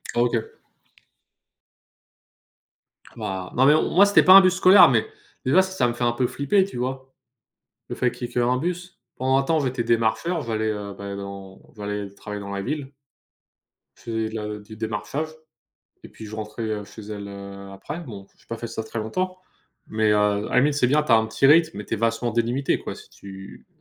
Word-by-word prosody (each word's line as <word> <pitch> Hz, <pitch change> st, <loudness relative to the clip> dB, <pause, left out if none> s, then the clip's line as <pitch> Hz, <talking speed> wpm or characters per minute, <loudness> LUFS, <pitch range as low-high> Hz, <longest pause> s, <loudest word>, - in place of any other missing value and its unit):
OK. 120 Hz, -1 st, +2 dB, 2.8 s
Bah 95 Hz, -1 st, -5 dB
bah 130 Hz, -, +4 dB
mais 145 Hz, -, +7 dB
non, 155 Hz, -, +2 dB
moi, 200 Hz, +3 st, +8 dB
c'était 200 Hz, -, +5 dB
pas 185 Hz, -, +8 dB
un 195 Hz, -, +11 dB
bus 185 Hz, -1 st, +3 dB
scolaire, 190 Hz, +1 st, +7 dB
mais -, -, +1 dB, 0.4 s
déjà, 135 Hz, +8 st, +4 dB
ç 190 Hz, 0 st, -4 dB
ça 125 Hz, -, +2 dB
me 120 Hz, -, -1 dB
fait 120 Hz, -, -4 dB
un 120 Hz, -, +3 dB
peu 120 Hz, +1 st, 0 dB
flipper, 145 Hz, +11 st, +1 dB
tu 195 Hz, -, -9 dB
vois? 130 Hz, +1 st, -4 dB, 0.8 s
Le -, -, -4 dB
fait 125 Hz, -, +1 dB
qu'il 120 Hz, -, -6 dB
y -, -, -17 dB
ait -, -, -17 dB
qu'1 125 Hz, +1 st, +2 dB
bus. 180 Hz, +2 st, -5 dB, 0.2 s
Pendant 130 Hz, +1 st, +2 dB
un -, -, +2 dB
temps, 160 Hz, +4 st, +1 dB
j'étais 130 Hz, -3 st, -1 dB
démarcheur, 115 Hz, +10 st, 0 dB
j'allais, 110 Hz, -2 st, -2 dB
heu, 100 Hz, -1 st, -5 dB
ben, 100 Hz, 0 st, -6 dB
dans 100 Hz, -1 st, -9 dB, 0.2 s
j'allais 105 Hz, -1 st, -5 dB
travailler 105 Hz, 0 st, -7 dB
dans 100 Hz, 0 st, -7 dB
la 100 Hz, 0 st, -3 dB
ville. 140 Hz, +3 st, -4 dB, 1.0 s
Je -, -, -22 dB
faisais 110 Hz, -1 st, -3 dB
de 110 Hz, -, -9 dB
la 105 Hz, -1 st, -4 dB
du 105 Hz, +1 st, -12 dB
démarchage 110 Hz, +8 st, -4 dB, 0.8 s
et -, -, -9 dB
puis, 110 Hz, -, -11 dB
je 105 Hz, -, -8 dB
rentrais, 110 Hz, +1 st, -5 dB
heu, 110 Hz, -1 st, -3 dB
chez 110 Hz, -, -12 dB
elle, 100 Hz, -1 st, -6 dB
heu, 100 Hz, 0 st, -9 dB
après. 145 Hz, -, -7 dB
Bon, 105 Hz, -, -9 dB
j'ai -, -, -27 dB
pas 115 Hz, -, -4 dB
fait 115 Hz, -, -5 dB
ça 110 Hz, -, -5 dB
très 115 Hz, -, -6 dB
longtemps 185 Hz, +13 st, -3 dB, 0.5 s
mais 110 Hz, 0 st, +1 dB
heu, -, -, +3 dB
à 105 Hz, -1 st, +2 dB
la 105 Hz, -, -3 dB
limite, 145 Hz, +3 st, +3 dB
c'est 140 Hz, -3 st, +2 dB
bien, 150 Hz, +4 st, +3 dB
tu 150 Hz, -, -6 dB
as -, -, +8 dB
un 110 Hz, 0 st, +2 dB
petit 110 Hz, +4 st, +1 dB
rythme 160 Hz, -2 st, +4 dB
mais 105 Hz, -, -6 dB
tu -, -, -3 dB
es -, -, -2 dB
vachement 115 Hz, +2 st, 0 dB
délimité, 120 Hz, +4 st, 0 dB
quoi, -, -, -6 dB
si -, -, -14 dB
tu 95 Hz, 0 st, -12 dB
115 Hz, 215 wpm, -23 LUFS, 105-140 Hz, 2.8 s, un